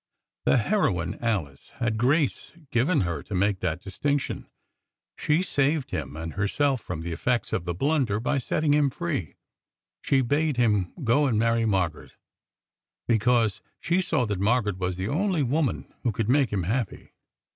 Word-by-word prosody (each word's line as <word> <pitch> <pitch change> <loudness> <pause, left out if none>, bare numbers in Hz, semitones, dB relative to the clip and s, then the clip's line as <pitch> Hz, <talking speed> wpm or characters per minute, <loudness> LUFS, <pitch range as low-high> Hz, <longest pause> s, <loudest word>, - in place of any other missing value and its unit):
The - - +4
heroine 100 - 0
Alice 90 - -2
had 120 -5 -1
grace 140 +2 +1 0.2
given 140 +7 +2
her 85 -5 -2
to 100 - -6
make 100 +1 +1
that 85 -2 -2
distinction. 140 +9 -2 0.7
She 155 +4 +1
saved 145 -4 0
him 75 - -4
and 80 0 -5
herself 130 +6 +1
from 80 -3 -5
the 85 +1 -4
effects 115 +6 -1
of 85 - -1
the 85 -1 -2
blunder 135 - +1
by 135 +4 0
setting 145 +3 +1
him 145 -1 +3
free. 145 - -3 0.7
She 135 -1 +2
bade 145 +2 +1
him 105 -6 +2
go 135 +5 +3
and 115 -5 +1
marry 115 0 +2
Margaret, 95 -6 -1 0.9
because 110 -2 +2 0.2
she 175 +3 +1
saw 125 -8 +1
that 105 -3 -2
Margaret 105 -2 +1
was 90 -1 -2
the 95 +1 -2
only 175 - +1
woman 140 +2 -1
who 120 - 0
could 110 +1 -2
make 135 0 +4
him 100 -3 0
happy." 115 +4 -3
115 Hz, 160 wpm, -26 LUFS, 95-145 Hz, 0.9 s, The